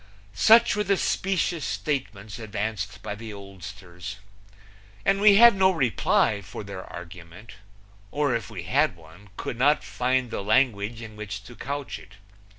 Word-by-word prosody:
Such 225 - +6
were 210 - +1
the 200 0 +2
specious 180 -5 0
statements 105 -3 -3
advanced 105 -2 -4
by - - -4
the 110 +1 -8
oldsters. 100 -1 -9 0.9
And 195 0 +2
we 205 -1 +7
had 235 +1 +8
no 190 -1 +5
reply 125 - +2
for 100 - -8
their 100 -2 -7
argument, 90 +5 -11 0.5
or 145 +1 0
if 115 - -4
we 95 -6 -7
had 140 - +2
one 85 +5 -17
could 120 - -5
not 145 +1 +4
find 125 +4 -1
the - - -3
language 110 0 +1
in 110 -1 -10
which 105 -1 -6
to 120 +3 -12
couch 140 +2 -5
it. 105 - -16
110 Hz, 155 wpm, -26 LUFS, 100-140 Hz, 0.9 s, had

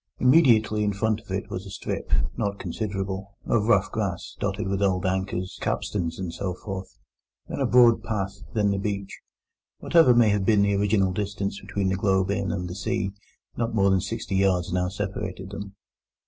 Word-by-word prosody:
Immediately 120 -7 +4
in 105 -1 +1
front 110 +2 0 0.3
was 95 +2 -5
a - - -8
strip—not 100 +1 -2
considerable—of 100 +2 -3
rough 100 -4 +3
grass, 100 -6 -3
dotted - - -2
with 95 0 -1
old 95 -1 +1
anchors, 95 0 -2
capstans, 85 -5 -2
and 90 -3 -4
so 90 0 -3
forth; 95 0 -7 0.5
then - - -5
a - - +2
broad 120 -2 +6
path; 100 -2 -3
then 105 -2 +2
the 100 - -1
beach. 100 -1 -4 0.6
Whatever 160 -8 +5
may 120 -2 +5
have 100 -1 +1
been 100 0 +4
the 100 0 +2
original 100 -2 +2
distance 100 0 -3
between 100 -2 -1
the 95 - 0
Globe 95 -1 +2
Inn 100 -3 -1
and 90 -1 -3
the 90 - -5
sea, 100 +1 -2 0.4
not 115 -1 -2
more 100 -2 +4
than 95 -1 +3
sixty 100 -1 -3
yards 90 -2 +2
now 90 0 +1
separated 95 -1 -5
them. 100 -1 -7
100 Hz, 170 wpm, -25 LUFS, 95-105 Hz, 0.6 s, broad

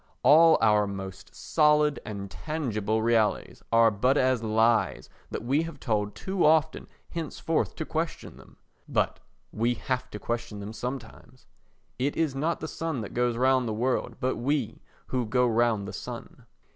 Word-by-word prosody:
All 160 +4 +7
our 105 -2 +4
most 95 -1 -8
solid 150 -1 +3
and 100 -2 -6
tangible 110 -9 -2
realities 115 -2 +1
are 115 0 +5
but 125 +7 +2
as 130 -3 +2
lies 110 +1 +1 0.2
that - - -5
we 135 +6 +2
have 165 -3 -6
told 105 -4 -1
too 190 -2 -2
often 155 0 +3 0.2
henceforth 165 -1 -2
to 160 - -4
question 165 +2 -4
them. - - -17 0.3
But - - 0 0.3
we 120 +2 0
have 130 +2 -3
to - - -7
question 115 -1 -4
them 100 +2 -7
sometimes. 130 0 -7 0.5
It 140 +3 -1
is 160 -4 +1
not 155 +5 -1
the 155 - -3
sun 160 -6 -3
that 105 - -7
goes 120 -1 0
round 130 0 +3
the 110 - -2
world 125 0 -1
but 130 +1 -1
we 135 -2 -1 0.3
who 125 -3 -1
go 125 +2 +2
round 115 -3 +1
the - - -7
sun. - - -8
125 Hz, 160 wpm, -27 LUFS, 110-150 Hz, 0.5 s, All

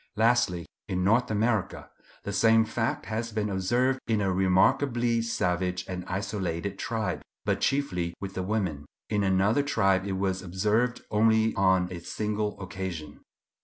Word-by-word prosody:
Lastly, 110 -7 +2 0.2
in 90 -1 -1
North 115 +6 +3
America, 110 -1 -1 0.3
the 100 - -4
same 110 +2 +5
fact 120 +5 -2
has 115 +1 -3
been 105 -1 -1
observed 120 +8 +1
in 110 -2 +1
a 95 -2 +1
remarkably 115 +6 +2
savage 90 -5 -1
and 90 -1 -4
isolated 95 -1 -3
tribe, 110 -3 -2 0.2
but - - 0
chiefly 90 -12 0
with 95 -1 -6
the 95 - -3
women; 90 -8 -2 0.2
in 105 -1 +1
another 95 +7 +3
tribe 95 -9 +1
it 100 - -2
was 95 -1 -1
observed 105 +7 0
only 110 +1 +3
on 95 -2 +3
a 90 - -5
single 105 +4 -3
occasion. 95 -5 -6
100 Hz, 145 wpm, -27 LUFS, 95-115 Hz, 0.3 s, same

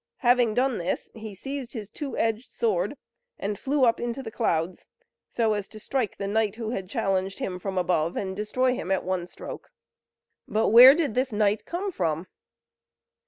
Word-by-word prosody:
Having 240 -3 +4
done 255 -1 +1
this 175 - -3
he 220 -2 -8
seized 270 +3 -6
his 210 -4 -7
two 285 +2 -5
edged 225 +2 -1
sword, 470 +1 -1 0.4
and 205 0 -3
flew 275 -1 +2
up 230 - +3
into 240 +3 -3
the 220 - -6
clouds, 175 -6 -1 0.4
so 225 -2 +1
as 205 -2 -3
to 215 - -11
strike 245 -2 -2
the 200 - -3
knight 215 0 0
who 225 -1 -4
had 190 -6 -4
challenged 190 0 -1
him 180 -1 -4
from 190 0 -4
above, 175 -2 +1
and 190 -1 -3
destroy 250 +5 +1
him 185 - -5
at 190 -1 +1
one 180 -1 -2
stroke. - - -9 0.8
But 220 +1 +1
where 250 +5 +10
did 310 -8 0
this 255 +2 0
knight 210 0 +1
come 380 +3 -3
from? 165 - -1
220 Hz, 180 wpm, -26 LUFS, 190-250 Hz, 0.8 s, where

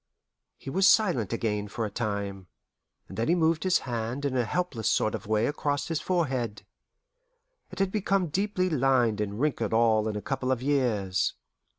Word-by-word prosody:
He 135 - -8
was 190 +5 +5
silent 175 - +3
again 105 -3 -1
for 110 +2 -3
a 105 - -5
time, 100 -4 -3 0.6
and 95 - -8
then 115 - 0
he 170 - +4
moved 160 -1 +2
his 185 -1 +3
hand 120 +3 -3
in 135 -2 -1
a 125 -2 +1
helpless 140 -5 -1
sort 110 - +1
of 110 - -5
way 110 +1 +2
across 145 +1 -1
his 165 -2 -1
forehead. 130 - -1 1.0
It - - -11
had 195 -1 +1
become 195 -4 0
deeply 190 +2 0
lined 130 - +2
and 105 0 -3
wrinkled 125 -7 0
all 110 -1 +3
in 110 - -2
a - - -2
couple 135 -1 -2
of 130 - +1
years. 115 -10 +1
125 Hz, 180 wpm, -27 LUFS, 110-160 Hz, 1.0 s, was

